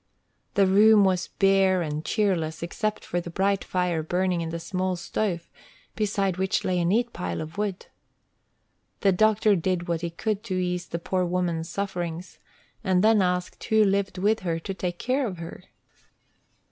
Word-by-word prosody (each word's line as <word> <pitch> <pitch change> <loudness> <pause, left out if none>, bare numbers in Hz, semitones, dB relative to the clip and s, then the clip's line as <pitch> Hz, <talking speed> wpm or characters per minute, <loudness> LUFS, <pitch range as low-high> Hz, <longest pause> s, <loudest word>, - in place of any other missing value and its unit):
The 200 - +5
room 205 +2 +6
was 185 -2 +1
bare 195 -2 +3
and 150 0 -3
cheerless 170 -8 0
except 215 +5 -3
for 175 - -2
the 170 - -8
bright 195 +3 0
fire 180 -3 0
burning 180 +2 0
in 165 - -3
the 170 +1 -4
small 185 +1 -2
stove, 175 -1 -2 0.5
beside 200 -3 0
which 190 0 0
lay 180 -1 +1
a 170 - +1
neat 235 +7 +1
pile 85 -1 -3
of 160 +5 -6
wood. 200 -3 -2 1.2
The 195 - +4
doctor 215 +2 +3
did 180 0 -1
what 170 -1 -1
he 170 - -2
could 205 +4 -2
to 185 - -2
ease 180 -1 -1
the 170 - -3
poor 185 +2 -1
woman 175 -2 0
s 165 - -6
sufferings, 180 -3 -4 0.4
and 190 -2 +2
then 220 -1 +5
asked 180 -1 -1
who 220 0 +4
lived 195 -1 0
with 210 +4 +2
her 170 -4 -2
to 195 +4 -5
take 180 -2 -3
care 255 +4 0
of 185 -4 -6
her. 165 0 -9
185 Hz, 175 wpm, -26 LUFS, 175-200 Hz, 1.2 s, room